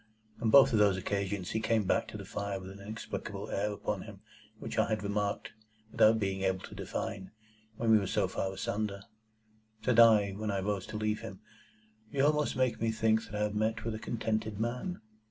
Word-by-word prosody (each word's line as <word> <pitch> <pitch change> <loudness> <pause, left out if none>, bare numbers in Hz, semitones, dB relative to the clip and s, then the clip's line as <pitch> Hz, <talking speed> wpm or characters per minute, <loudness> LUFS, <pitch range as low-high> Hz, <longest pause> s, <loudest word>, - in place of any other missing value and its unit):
On 115 - +2
both 135 +1 +7
of 110 - +4
those 100 -3 +4
occasions, 100 -1 -2
he 110 - 0
came 110 -1 +1
back 95 - +1
to - - -7
the - - -8
fire 100 -1 -3
with 95 +1 -9
the 100 - -12
inexplicable 105 -1 -6
air 105 +2 0
upon 105 - -3
him - - -11 0.4
which - - -4
I - - +3
had 110 -1 -1
remarked, 100 0 -2 0.4
without 110 +1 +5
being 95 -2 -1
able 95 -1 0
to - - -12
define, 95 -2 -4 0.5
when 115 -1 +2
we 110 - +7
were 100 - -2
so - - +1
far 95 - -2
asunder. 100 +1 -3 0.8
Said 125 -2 +3
I, 110 -4 +7
when 105 +2 -4
I 100 -1 0
rose 100 -1 -2
to 105 - -5
leave 110 0 0
him, - - -9 0.7
"You 135 0 +2
almost 150 0 +2
make 130 -2 +1
me 115 -1 +2
think 110 0 +2
that 105 - -9
I 105 - 0
have 105 -1 -1
met 110 +2 0
with 115 - -1
a 110 - -5
contented 110 -2 -2
man." 125 +11 -3
105 Hz, 210 wpm, -31 LUFS, 100-110 Hz, 0.8 s, both